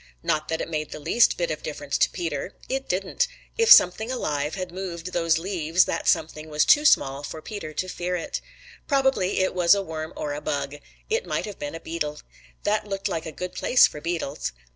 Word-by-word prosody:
Not 155 0 0
that 160 - -2
it - - -3
made 155 -2 -3
the - - -7
least 235 +10 +3
bit 170 -2 -1
of 155 - -4
difference 145 -2 -4
to - - +4
Peter. 165 0 -4
It 270 +1 -3
didn't. 195 - 0 0.3
If 455 0 +3
something 220 +7 +7
alive 150 - -2
had 185 -2 -5
moved 180 -1 -6
those 165 -2 +2
leaves, 170 -1 +1
that - - -3
something 155 -1 +1
was 150 0 +2
too 295 0 +5
small 135 - +4
for 150 +2 -6
Peter 180 -1 -7
to 185 - -2
fear 180 0 -3
it. 170 - -4 0.5
Probably 265 -10 +2
it 185 - +1
was 180 +1 +5
a 200 - -1
worm 160 -2 -5
or 145 - -3
a 145 - -5
bug. 145 -1 -3 0.3
It 460 +2 0
might - - -1
have 205 -2 -8
been 145 +2 -5
a - - -6
beetle. 150 -3 -4 0.4
That 210 0 0
looked 195 0 -2
like 165 -3 -3
a - - -5
good 180 +4 -6
place 250 - +5
for 150 - -4
beetles. 160 - -3
170 Hz, 210 wpm, -25 LUFS, 155-195 Hz, 0.5 s, something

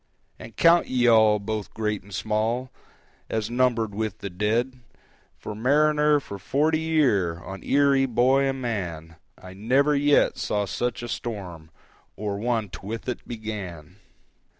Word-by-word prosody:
"And 110 -2 -11
count 170 +5 +5
ye 125 -1 +1
all, 110 -2 +5
both 105 0 -5
great 105 -2 -2
and 100 - -17
small, 110 +5 -1 0.6
As 110 0 -2
numbered 120 -4 +1
with 110 0 -3
the 100 -3 -7
dead: 115 +7 -1 0.6
For 105 - -7
mariner 150 +5 +3
for 100 -7 -9
forty 155 +8 +1
year, 130 - +1
On 95 +2 -8
Erie, 140 -1 +3
boy 130 +3 +3
and 135 0 -1
man, 85 -9 -4 0.2
I 95 0 -11
never 130 +9 +2
yet 145 0 +3
saw 105 -1 -1
such 120 +5 -3
a - - -4
storm, 95 -10 -6 0.5
Or 100 -1 -4
one't 110 -7 -2
with 110 +5 -6
it 125 - -5
began!" 100 -7 -7
110 Hz, 145 wpm, -25 LUFS, 100-130 Hz, 0.6 s, count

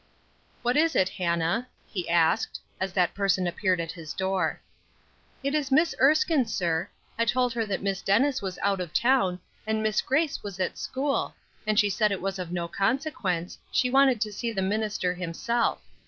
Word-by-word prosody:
"What 245 +3 +2
is 325 +1 +3
it, 185 - +3
Hannah?" 170 +6 0 0.2
he 180 -5 -5
asked, 165 -1 +2 0.2
as 190 0 -2
that 180 -2 +2
person 195 -2 +1
appeared 180 +1 0
at 165 -1 -3
his 165 -3 -8
door. 190 -3 0 0.8
"It 280 +1 0
is 295 -3 0
Miss 320 +5 +4
Erskine, 300 - +4
sir. 175 -3 -1 0.3
I 230 - +3
told 250 +1 +1
her 225 -2 -1
that 195 -1 -2
Miss 195 -1 -1
Dennis 260 +7 +2
was 190 -2 -4
out 195 -2 +1
of 175 -3 -6
town, 235 -8 +3 0.3
and 220 0 0
Miss 215 0 +2
Grace 300 +2 0
was 200 -2 -7
at 185 - -2
school, 275 +1 -1 0.3
and 215 0 +3
she 205 -1 +3
said 210 +2 +2
it 195 - -1
was 195 0 -3
of 175 -2 -5
no 175 -1 -2
consequence, 195 - -1
she 250 - +2
wanted 265 -3 +5
to 210 -2 -1
see 235 +3 -3
the 195 -4 -1
minister 205 -2 0
himself. 185 +7 -1
200 Hz, 185 wpm, -27 LUFS, 180-250 Hz, 0.8 s, wanted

